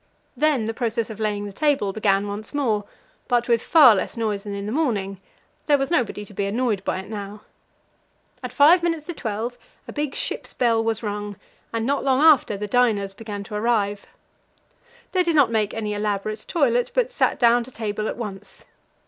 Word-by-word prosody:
Then 295 Hz, -7 st, +2 dB
the 225 Hz, -, -2 dB
process 230 Hz, -1 st, -2 dB
of 220 Hz, -, -9 dB
laying 210 Hz, -1 st, -1 dB
the 200 Hz, -, -7 dB
table 275 Hz, -7 st, +1 dB
began 200 Hz, -1 st, +1 dB
once 210 Hz, +6 st, -6 dB
more, 220 Hz, -8 st, 0 dB, 0.4 s
but 240 Hz, -1 st, +1 dB
with 235 Hz, -2 st, +3 dB
far 290 Hz, -6 st, +7 dB
less 195 Hz, -, -3 dB
noise 215 Hz, -3 st, -1 dB
than 200 Hz, -1 st, -6 dB
in 200 Hz, 0 st, -5 dB
the 210 Hz, -, -4 dB
morning; 205 Hz, -, -1 dB, 0.5 s
there 290 Hz, -2 st, +5 dB
was 275 Hz, +2 st, -2 dB
nobody 225 Hz, -8 st, 0 dB
to 205 Hz, -, -14 dB
be 200 Hz, 0 st, -2 dB
annoyed 215 Hz, -2 st, -1 dB
by -, -, -1 dB
it 190 Hz, -, -13 dB
now. 205 Hz, -1 st, -7 dB, 1.0 s
At -, -, -6 dB
five 315 Hz, +5 st, +6 dB
minutes 330 Hz, -3 st, -1 dB
to 350 Hz, -, -5 dB
twelve 235 Hz, -2 st, -4 dB, 0.3 s
a -, -, -8 dB
big 295 Hz, -2 st, -3 dB
ship's -, -, -4 dB
bell 230 Hz, -2 st, +2 dB
was 225 Hz, 0 st, -1 dB
rung, 205 Hz, -1 st, -4 dB, 0.4 s
and 230 Hz, -1 st, -2 dB
not 280 Hz, +2 st, 0 dB
long 265 Hz, -1 st, +2 dB
after 295 Hz, -9 st, +5 dB
the 210 Hz, -, -4 dB
diners 210 Hz, -3 st, +1 dB
began 205 Hz, -1 st, -7 dB
to 200 Hz, -, -11 dB
arrive. 210 Hz, -2 st, 0 dB, 1.0 s
They 370 Hz, -, +2 dB
did 340 Hz, -2 st, +1 dB
not 275 Hz, -6 st, +4 dB
make 215 Hz, -2 st, +1 dB
any 215 Hz, -2 st, -3 dB
elaborate 210 Hz, +1 st, -3 dB
toilet, 245 Hz, -7 st, +1 dB
but -, -, +1 dB
sat -, -, +1 dB
down 240 Hz, 0 st, +4 dB
to -, -, -11 dB
table 215 Hz, -2 st, -3 dB
at -, -, -4 dB
once. 205 Hz, -4 st, -8 dB
225 Hz, 195 wpm, -23 LUFS, 205-255 Hz, 1.0 s, far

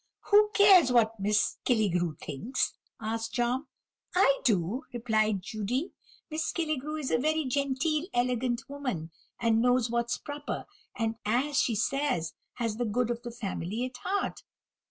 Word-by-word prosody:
"Who 420 Hz, +1 st, +7 dB
cares 380 Hz, -9 st, +7 dB
what 225 Hz, -2 st, +3 dB
Miss 210 Hz, +2 st, +1 dB
Killigrew 180 Hz, -, +1 dB
thinks?" 215 Hz, -, -2 dB, 0.3 s
asked 225 Hz, +1 st, -3 dB
Tom. 250 Hz, +3 st, 0 dB, 0.5 s
"I 320 Hz, -7 st, +4 dB
do," 205 Hz, +2 st, +1 dB
replied 215 Hz, -4 st, +1 dB
Judy; 220 Hz, -, -2 dB, 0.4 s
"Miss 315 Hz, +1 st, -1 dB
Killigrew 310 Hz, -3 st, -2 dB
is 275 Hz, -, -3 dB
a -, -, +3 dB
very 310 Hz, +3 st, +1 dB
genteel, 280 Hz, +4 st, 0 dB
elegant 245 Hz, 0 st, 0 dB
woman, 250 Hz, -, -4 dB, 0.3 s
and 225 Hz, -1 st, +3 dB
knows 245 Hz, -1 st, +3 dB
what's 235 Hz, 0 st, 0 dB
proper; 290 Hz, +1 st, -5 dB, 0.3 s
and, 225 Hz, -2 st, -1 dB
as 260 Hz, +7 st, +1 dB
she 230 Hz, -, +1 dB
says, 240 Hz, -, 0 dB, 0.2 s
has 225 Hz, -3 st, -2 dB
the 245 Hz, -, 0 dB
good 240 Hz, +2 st, 0 dB
of 235 Hz, 0 st, -3 dB
the 240 Hz, -, -6 dB
family 220 Hz, -1 st, -3 dB
at 255 Hz, -1 st, -7 dB
heart." 385 Hz, +11 st, -2 dB
245 Hz, 145 wpm, -29 LUFS, 220-280 Hz, 0.5 s, Who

